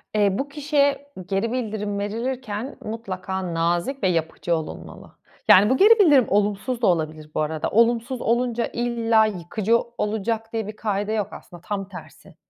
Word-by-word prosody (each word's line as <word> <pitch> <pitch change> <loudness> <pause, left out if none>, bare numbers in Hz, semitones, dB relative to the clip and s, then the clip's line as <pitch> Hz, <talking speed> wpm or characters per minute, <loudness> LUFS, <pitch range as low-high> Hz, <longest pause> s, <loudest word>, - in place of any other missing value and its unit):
Eee, 205 -1 +4
bu 275 - -2
kişiye 285 -1 0
geri 195 +5 -1
bildirim 210 -4 -3
verilirken 230 +3 -4
mutlaka 190 -5 -4
nazik 175 +10 -1
ve - - +4
yapıcı 170 0 -1
olunmalı. 160 -1 -8 0.4
Yani, 200 +3 +7
bu 260 - +3
geri 445 +6 +6
bildirim 290 - +6
olumsuz 210 +5 0
da 230 - +3
olabilir 155 -3 -1
bu - - +1
arada. 155 0 -2
Olumsuz 235 +2 +2
olunca 240 0 0
illa 230 -2 +2
yıkıcı 210 +3 0 0.2
olacak 220 +2 -2
diye 220 -2 -2
bir 210 - -7
kaide 205 -1 -2
yok, 210 -3 -1
aslında 175 -1 -12
tam 195 +1 -4
tersi. 185 - -12
215 Hz, 155 wpm, -23 LUFS, 190-240 Hz, 0.4 s, Yani